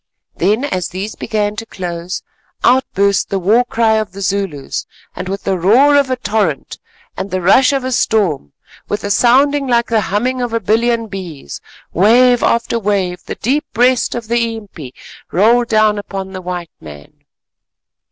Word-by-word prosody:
Then 210 +9 +1
as 185 - -2
these 195 +4 -5
began 210 -1 -2
to 225 - -5
close, 175 -1 -5 0.4
out 260 +2 +4
burst 200 0 +2
the 195 - -1
war 210 +7 +3
cry 225 -2 +1
of 215 -3 -3
the 200 - -8
Zulus, 190 -7 -3 0.3
and 185 - -5
with 195 +1 -4
the 190 -2 -1
roar 250 +11 +5
of 280 -2 +3
a 255 - +1
torrent 205 - -2 0.4
and 195 - -5
the 185 - -2
rush 255 +10 +4
of 275 -2 -1
a 260 - -3
storm, 190 - 0 0.4
with 205 - -3
a 205 - -2
sound 260 +6 +4 0.2
like 235 -1 +3
the 225 -2 +2
humming 245 +6 -1
of 240 -2 -3
a 230 - +1
billion 230 +3 +1
bees, 180 - -8 0.3
wave 240 +6 +4
after 235 0 +1
wave 190 -4 -1
the - - -5
deep 275 +7 -1
breast 250 +1 +2
of 235 -2 -5
the 230 0 0
impi 175 - -10 0.4
rolled 235 +6 +3
down 215 -2 +2
upon 195 -1 -6
the 185 -1 -7
white 175 -2 -5
men. 75 -2 -13
210 Hz, 170 wpm, -16 LUFS, 185-235 Hz, 0.4 s, roar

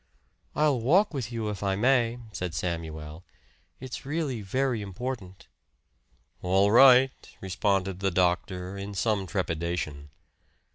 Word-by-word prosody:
"I'll 150 -5 +2
walk 175 - +3
with 125 -5 -4
you, 115 -2 -3
if 105 -2 -5
I 100 -1 0
may," 120 +1 +2
said 90 -2 -4
Samuel. 80 -2 -5 0.6
"It's 130 0 -7
really 140 -5 -2
very 125 +3 -1
important." 100 -1 -6 0.9
"All 95 +3 +3
right," 130 +2 +7 0.3
responded 95 0 -1
the 95 0 +1
doctor 90 +1 -1
in 100 +1 -6
some 100 -2 0
trepidation. 85 -6 -3
100 Hz, 115 wpm, -27 LUFS, 90-125 Hz, 0.9 s, right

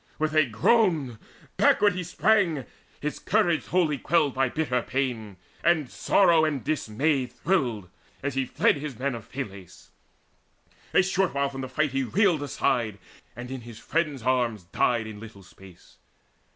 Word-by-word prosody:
With 155 0 -1
a 155 -2 +4
groan 140 - +2 0.4
Backward 205 -2 +4
he 180 0 -4
sprang, 175 - +1 0.4
his 150 +1 -3
courage 175 -6 +1
wholly 160 -6 +1
quelled 150 -3 +2
By 135 -1 +1
bitter 125 -4 -1
pain; 115 -7 -3 0.3
and 160 -6 +2
sorrow 170 -5 +3
and 145 -6 -1
dismay 135 0 0
Thrilled, 125 - -1 0.4
as 140 0 -2
he 135 0 -1
fled, - - +2
his 140 -4 -6
men 140 +2 -1
of 115 -2 -9
Phylace. 100 -9 -8 1.1
A - - +6
short 190 -3 0
way 140 0 +1
from 135 -1 -7
the 130 - -5
fight 150 +1 0
he 135 +1 0
reeled 170 - +2
aside, 120 -6 -1 0.4
And 125 +2 -8
in 130 -1 -5
his 115 -1 -11
friends' 150 -5 -2
arms 120 -5 0
died 110 +5 0
in 110 -1 -8
little 105 -3 -12
space. 95 -1 -17
135 Hz, 155 wpm, -26 LUFS, 120-160 Hz, 1.1 s, A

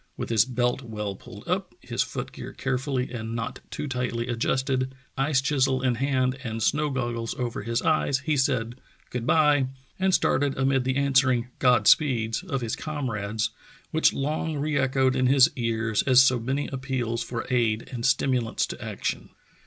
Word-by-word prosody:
With - - -4
his 115 -2 +4
belt 125 0 0
well 105 -4 -4
pulled - - -12
up, - - -2
his - - -2
foot - - -3
gear - - -8
carefull}' 135 +1 -1 0.2
and 115 -1 -4
not 115 +2 -4
too 150 - -4
tightly 125 -2 -2
adjusted, 130 +2 0 0.2
ice 135 0 +2
chisel 135 -2 +1
in 125 -2 +2
hand 130 0 0
and 115 -3 -3
snow 150 +5 +1
goggles 120 -3 -2
over 120 -2 -3
his 115 +2 -2
eyes, 155 -3 +2
he 155 +1 0
said 130 -3 0 0.3
*'Good 125 -1 -3
by, 150 -4 +4 0.2
" 135 - -35
and 190 0 +2
started 140 -5 +2
amid 135 -1 +2
the 130 0 0
answering 130 -3 +2
"God 125 -1 +4
speeds" 115 -7 +3
of 150 -8 -3
his 115 -1 -2
comrades, 110 -8 -3 0.4
which - - +4
long 155 +2 -2
re 150 +1 -1
echoed 135 -1 +2
in 130 -1 +2
his 135 -1 +6
ears 115 -3 0
as 130 -2 +5
so 130 -2 +3
many 135 +5 -1
appeals 130 -3 -2
for 115 0 -4
aid 115 -3 +1
and 120 -2 -4
stimulants 125 -2 +1
to - - -8
action. - - -4
130 Hz, 175 wpm, -26 LUFS, 115-135 Hz, 0.4 s, his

